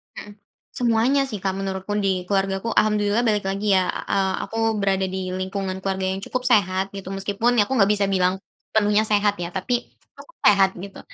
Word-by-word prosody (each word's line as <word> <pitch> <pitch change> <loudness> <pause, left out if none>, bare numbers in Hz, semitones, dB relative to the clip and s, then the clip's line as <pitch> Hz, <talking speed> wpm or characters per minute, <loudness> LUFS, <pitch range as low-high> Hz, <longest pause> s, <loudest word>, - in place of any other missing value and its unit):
Hmm. 205 - -9 0.4
Semuanya 245 +3 +2
sih, 210 -5 -5
Kak, 190 -1 0
menurutku. 195 0 -4
Di 185 -2 0
keluargaku 195 +2 0
alhamdulillah 210 +2 +2
balik 210 -2 +1
lagi 200 +1 0
ya, 185 -1 +2
a - - -4
eee, 190 -1 +1
aku 225 - -7 0.2
berada 195 -1 +1
di 190 - -4 0.2
lingkungan 190 0 -3
keluarga 190 0 -2
yang 195 - -5
cukup 255 0 -3
sehat 190 -5 +2
gitu, 195 -1 -7
meskipun 205 +4 0
ya 215 - +6
aku 265 - -3
enggak 205 -4 +4
bisa 200 - +2
bilang 190 -1 +1 0.3
sepenuhnya 210 -1 +3
sehat 205 -1 +2
ya, 170 - -3
tapi 190 +6 -3 0.4
cukup - - -15
sehat 195 -2 +6
gitu. 195 0 -9
195 Hz, 190 wpm, -22 LUFS, 190-210 Hz, 0.4 s, ya